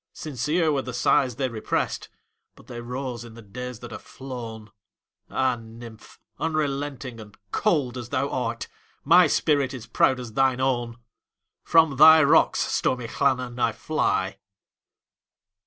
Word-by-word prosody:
Sincere 155 +3 -1
were 140 -2 0
the 125 -2 -7
sighs 125 0 +2
they 130 +1 -1
represt, 115 -3 -3 0.5
But - - -18
they 120 -1 -8
rose 125 -1 -5
in 115 -1 -12
the 115 - -12
days 125 +3 -8
that 120 - -9
are - - -6
flown! 115 -5 -9 0.6
Ah, 130 -2 +1
nymph! 115 0 -13 0.2
unrelenting 140 -5 -2
and 105 -2 -13
cold 140 - 0
as 120 -1 -8
thou 140 0 0
art, 120 -2 -3 0.4
My 175 +3 +6
spirit 140 -3 +1
is 120 -3 -8
proud 130 +2 +2
as 120 -3 -8
thine 130 +1 +2
own! 120 -3 -1 0.7
From 160 -4 +4
thy 160 +2 +9
rocks, 140 - +4
stormy 125 -2 0
Llannon, 125 -2 -1
I - - +2
fly. - - -1
130 Hz, 140 wpm, -25 LUFS, 120-140 Hz, 0.7 s, thy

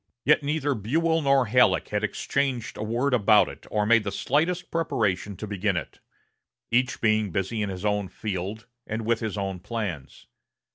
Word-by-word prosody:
Yet 150 +2 +5
neither 145 0 0
Buell 160 +9 +1
nor 135 -2 +3
Halleck 115 -4 +3
had 105 0 -1
exchanged 130 +2 -1
a - - -7
word 120 +5 0
about 105 -4 +5
it, - - -11
or 105 -1 0
made 115 0 +4
the 100 - -3
slightest 165 - 0
preparation 105 - -1
to 105 - -5
begin 100 -2 -1
it; 85 - -6 0.7
each 125 +3 +1
being 110 -2 +2
busy 95 +5 -2
in 105 - -1
his 95 +1 -5
own 105 -1 0
field, 100 +3 -5 0.2
and 110 0 -3
with 115 0 +1
his 110 -2 -3
own 95 -2 -3
plans. 95 - -5
110 Hz, 175 wpm, -26 LUFS, 100-130 Hz, 0.7 s, Yet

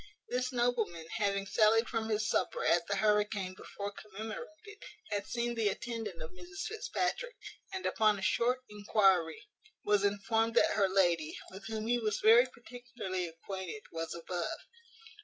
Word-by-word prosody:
This 250 +1 0
nobleman, 240 -9 0
having 200 -2 +1
sallied 220 +3 +4
from 225 0 -2
his 215 0 +1
supper - - 0
at 170 0 +3
the 200 - 0
hurricane 210 -2 +1
before 200 +1 -6
commemorated, 220 - -8 0.3
had 205 -1 -1
seen 240 0 -1
the 225 -2 +1
attendant 210 -6 -4
of 160 - -8
Mrs 180 -1 -9
Fitzpatrick, 485 +2 -2 0.4
and 380 -1 -4
upon 215 -1 +3
a 190 - -6
short 250 +5 +2
enquiry, 195 -5 +2 0.4
was 205 -1 +3
informed 225 +3 +1
that - - +5
her 195 -2 +3
lady, 175 -5 +2
with 190 +3 -9
whom 220 -1 -3
he 240 +1 +2
was 215 -3 0
very 230 +4 +7
particularly 240 -7 -5
acquainted, 190 +4 -6
was 165 0 -4
above. 170 +1 -3
210 Hz, 150 wpm, -33 LUFS, 190-235 Hz, 0.4 s, very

